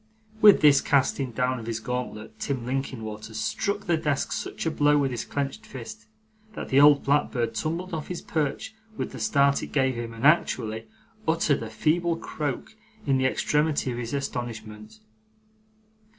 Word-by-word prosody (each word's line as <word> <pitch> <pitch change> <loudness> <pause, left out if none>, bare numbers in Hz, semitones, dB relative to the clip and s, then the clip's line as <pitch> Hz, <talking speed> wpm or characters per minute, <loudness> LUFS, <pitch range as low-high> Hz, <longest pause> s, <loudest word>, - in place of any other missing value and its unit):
With 210 -2 +8
this 145 -2 +6
casting 135 -1 +1
down 125 +2 0
of 115 - -9
his 115 -1 -2
gauntlet, 110 -2 -5
Tim 130 -4 -3
Linkinwater 110 -5 -4
struck 200 - -1
the 175 -5 +1
desk 145 -2 -1
such - - -4
a 160 - +1
blow 150 -1 +3
with 140 -2 +1
his 120 -2 -3
clenched 140 -1 -3
fist, 110 -4 -9 0.5
that - - -6
the 135 +1 +5
old 145 -1 +7
blackbird 125 -5 +1
tumbled 165 +10 -3
off 155 -2 -4
his 180 - -5
perch 160 +8 -2 0.2
with - - -3
the - - -8
start 140 -8 +3
it - - -5
gave 135 -2 +1
him, 120 -1 -5
and 115 +3 -5
actually 115 -8 +2 0.4
uttered 160 -4 +2
a 115 - -5
feeble 165 +9 +1
croak, 150 - -4 0.3
in 135 -2 +2
the 130 - +1
extremity 150 0 +1
of 120 - -4
his 120 +3 -3
astonishment. 115 - -6
135 Hz, 165 wpm, -26 LUFS, 115-150 Hz, 0.5 s, With